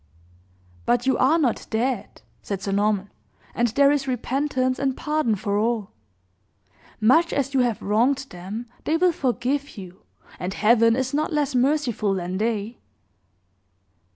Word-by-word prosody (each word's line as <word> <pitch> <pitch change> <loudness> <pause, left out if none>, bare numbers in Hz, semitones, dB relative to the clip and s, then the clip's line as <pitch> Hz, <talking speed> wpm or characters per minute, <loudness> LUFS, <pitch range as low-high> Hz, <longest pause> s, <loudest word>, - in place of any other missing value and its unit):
"But 245 +1 +2
you 265 - +3
are 285 +6 +4
not 270 -8 0
dead," 230 -2 -2 0.2
said 200 -2 -4
Sir 200 - -2
Norman; 205 0 0 0.4
"and 240 - +1
there 280 +5 +4
is 280 -2 0
repentance 255 +1 -1
and 270 -2 -1
pardon 300 -7 0
for 205 0 -1
all. 220 -2 -1 1.1
Much 320 +10 +4
as 280 0 -1
you 270 - +2
have 240 -3 0
wronged 250 +7 +1
them, 190 +7 -6 0.2
they 320 - +2
will 360 +1 +3
forgive 270 0 -2
you; 185 -1 -10 0.4
and 180 +2 -4
Heaven 230 +1 +4
is 260 +1 -2
not 305 +3 0
less 295 -3 0
merciful 250 -6 +1
than 185 +1 -3
they!" 220 +1 -2
245 Hz, 145 wpm, -23 LUFS, 210-275 Hz, 1.1 s, are